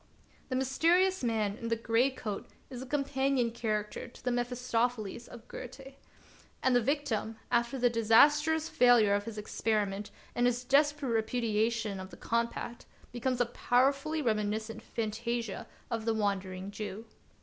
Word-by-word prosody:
The 255 - -1
mysterious 335 +8 +2
man 215 -4 0
in 230 - -5
the 230 - +1
gray 230 +3 +2
coat 220 -6 -5 0.2
is 250 -1 -6
a 260 - -7
companion 270 -3 +1
character 215 -1 -3
to 235 - -16
the 250 - +2
Mephistopheles 245 -2 -1
of 235 -2 -12
Goethe. 270 +2 -9 0.7
And 260 -1 +4
the 245 - +5
victim, 235 -4 -1 0.2
after 235 +2 +1
the 245 -1 +3
disastrous 295 +8 +4
failure 245 -9 +5
of 205 0 0
his 225 -2 -7
experiment 210 -1 -1 0.2
and 245 0 +2
his 245 0 0
desperate 290 +1 +2
repudiation 225 -2 0
of 190 0 -7
the 175 - -12
compact, 235 0 -2 0.2
becomes 250 +1 -1
a 245 - +4
powerfully 275 +6 +1
reminiscent 220 -1 -1
fa7ttasia 230 0 -3 0.2
of 225 -1 -2
the 225 -1 +1
Wandering 195 -2 -2
Jew. 215 +1 -6
235 Hz, 145 wpm, -31 LUFS, 220-260 Hz, 0.7 s, the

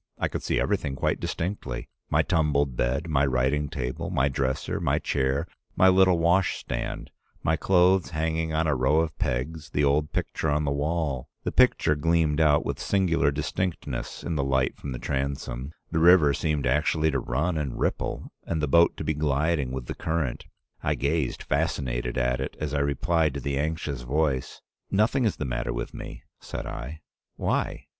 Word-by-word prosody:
I - - 0
could - - -4
see - - 0
everything 70 - 0
quite - - 0
distinctly 75 -9 -4
— - - -53
my - - +3
tumbled 75 -5 +1
bed, 65 +8 0
my 75 -4 +2
writing 70 +2 +1
table, 65 +8 -4
my 70 -6 +2
dresser, 65 0 -1
my - - +1
chair, 65 0 0 0.3
my 95 +1 +6
little 95 -1 +5
wash 85 +3 +2
stand, - - -5 0.3
my 80 - +2
clothes 90 +1 +3
hanging 80 0 -1
on 80 +1 +1
a 75 - +2
row 65 +5 +3
of 80 -1 -3
pegs, 70 +5 -2
the 75 - 0
old 75 +1 +2
picture 80 - -2
on 75 +1 +1
the 70 - 0
wall. 70 -2 -1
The - - -1
picture 75 - +4
gleamed 80 0 +2
out 75 -2 +4
with - - -3
singular 90 -7 +2
distinctness 80 +5 -3
in 85 - -2
the 70 - 0
light 65 -1 +1
from 70 - -7
the 65 - -4
transom. 65 0 -3 0.2
The 80 - +1
river 85 -4 +6
seemed 75 -3 -1
actually 80 +1 +2
to 70 - 0
run 80 +8 -1
and 75 -5 -3
ripple, - - -2 0.2
and 80 - -1
the 75 - 0
boat 85 +5 +4
to - - -4
be 80 - 0
gliding 75 -1 0
with 65 -1 -4
the - - -4
current. 80 -6 -2 0.3
I - - 0
gazed 70 -1 -1
fascinated 65 -5 -1
at 60 +1 +1
it, 65 - -5
as 75 -2 -3
I 70 - +1
replied 70 +2 +1
to - - -2
the 70 +1 -2
anxious 75 -3 -2
voice: 70 0 -1 0.3
"'Nothing 115 +6 +2
is 105 - +1
the 75 - -4
matter - - -2
with - - -4
me,' - - -8 0.2
said - - -6
I. 70 +6 -6 0.3
'Why? - - -1
75 Hz, 185 wpm, -26 LUFS, 65-80 Hz, 0.3 s, my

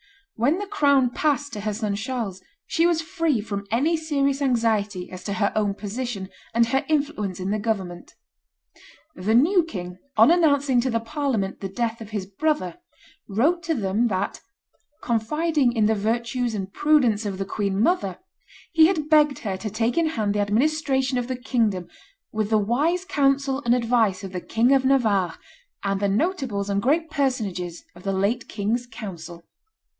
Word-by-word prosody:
When 270 +9 +1
the 410 - -3
crown 280 -10 +3
passed 285 -1 0
to 210 - -4
her 215 0 -2
son 210 -2 -2
Charles 220 -4 -4 0.2
she 335 -1 +2
was 330 -2 +1
free 330 -7 0
from 200 -1 -5
any 275 - +2
serious 285 -3 0
anxiety 220 -7 0
as 185 0 -8
to 200 - -2
her 205 -1 +1
own 205 -2 +1
position 210 -1 -5 0.3
and 235 0 +5
her 265 +4 0
influence 280 - -1
in 185 +2 -2
the 215 - 0
government. 190 -5 -3 1.0
The 220 -3 0
new 345 +9 +5
king, 180 - -7 0.2
on 225 +8 +7
announcing 285 -7 +3
to 260 - -1
the 230 -1 +1
Parliament 230 -5 -2
the 195 - -5
death 230 +3 -2
of 215 - -8
his 205 -4 -3
brother, 250 - -1 0.5
wrote 295 - +2
to 330 -1 -1
them 215 +1 +1
that 190 -4 -2 0.6
"confiding 265 +4 +1
in 220 -3 +2
the 220 - +3
virtues 235 +3 -1
and 195 -1 -5
prudence 255 -8 +3
of 195 -2 -4
the 195 - -3
queen 200 -1 -2
mother, 215 - +1 0.5
he 320 -2 +6
had 320 -5 -1
begged 300 -2 +4
her 200 -4 -3
to 215 +3 -4
take 225 +3 0
in 335 -1 +2
hand 215 -9 -1
the 205 - -1
administration 265 +4 +1
of 240 - -3
the 255 - -2
kingdom, 225 -8 0 0.4
with 215 -1 -1
the 220 - +4
wise 290 - +1
counsel 275 -3 +1
and 240 +1 +4
advice 225 -5 +1
of 190 - -6
the 180 -1 -4
King 230 +7 +2
of 270 -1 +4
Navarre 225 - +2 0.5
and 195 -1 0
the 200 0 +1
notables 225 - -1
and 200 0 +1
great 315 +6 +1
personages 210 - -2
of 175 - -13
the 195 +1 -2
late 200 +6 0
king's 225 +4 -2
council." 170 -7 -8
230 Hz, 175 wpm, -24 LUFS, 200-280 Hz, 1.0 s, on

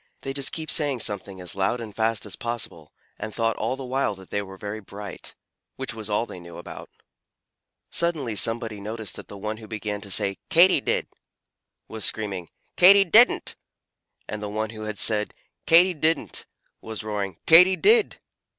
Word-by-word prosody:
They 135 - -4
just 135 -1 -1
kept 160 -1 -2
saying 145 -6 +1
something 100 -2 -4
as 90 +1 -5
loud 100 +5 0
and 110 -3 -8
fast 110 -1 0
as - - -5
possible 115 -10 -5 0.3
and 110 +1 -5
thought 115 -1 +1
all 115 +4 -1
the 135 0 -7
while 125 -4 0
that 95 -1 -14
they 100 - 0
were 95 -1 -10
very 105 +2 -6
bright 100 -1 -9 0.4
which 130 -2 -3
was 110 -1 -7
all 105 +3 +1
they 95 - -10
knew 85 -1 -11
about 85 - -9
it. - - -35 0.9
Suddenly 155 -10 0
somebody 115 -1 -1
noticed 110 -1 -5
that - - -10
the 100 - -10
one 105 +2 -4
who 110 -1 -11
began 105 -1 -4
to 105 - -9
say 100 +1 +2
"Katy 170 -2 +5
did!" - - -1 0.8
was 110 -1 -5
screaming 100 -6 -1 0.3
"Katy 195 +2 +8
didn't!" 225 +7 +5 0.7
and 105 - -5
the 105 - -4
one 110 +1 -3
who 110 -1 -7
had 110 -1 -4
said 105 -1 +2 0.3
"Katy 175 +3 +6
didn't!" 160 +1 -1 0.3
was 110 -1 -6
roaring 100 -4 -4
"Katy 180 +3 +8
did!" 430 - +3
110 Hz, 180 wpm, -24 LUFS, 105-135 Hz, 0.9 s, Katy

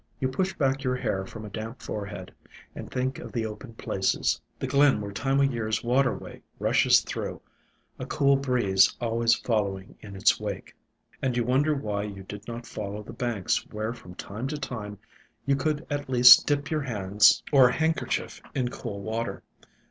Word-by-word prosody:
You 130 - 0
push 190 +8 -1
back 135 -2 0
your 125 -1 0
hair 95 -6 -2
from 110 +1 -9
a - - -7
damp 110 +4 -6
forehead 105 -1 -6 0.4
and - - -8
think 130 +1 -2
of - - -8
the 115 -2 -2
open 115 +2 -8
places, 95 -3 0 0.2
the - - -4
glen 140 -4 +4
where 100 -1 -5
Time 135 +7 0
o' - - +5
Year's 115 -5 -1
waterway 125 +2 0 0.2
rushes - - +4
through, - - -5 0.6
a - - -5
cool 140 -2 +3
breeze 125 -8 +3
always 115 0 +2
following 100 -5 -2
in 100 -2 -10
its 95 - +3
wake, - - -6 0.5
and 125 -2 0
you 120 - +2
wonder 140 +5 +2
why 105 -6 -2
you 100 -2 -7
did 105 +2 -9
not 120 0 -6
follow 105 -1 -6
the - - -10
banks 115 -7 -1
where 110 +2 -3
from 100 -7 -13
time 110 +8 -5
to 150 +2 -3
time 110 -7 -6 0.5
you 140 0 +3
could 150 +3 -1
at 145 -2 -4
least 125 -1 +8
dip 145 0 0
your 155 -1 0
hands 105 -4 +3
or 135 -3 +7
handkerchief 160 +5 -1
in 125 -3 0
cool 105 -5 -6
water. 115 +2 -3
120 Hz, 180 wpm, -27 LUFS, 105-135 Hz, 0.6 s, least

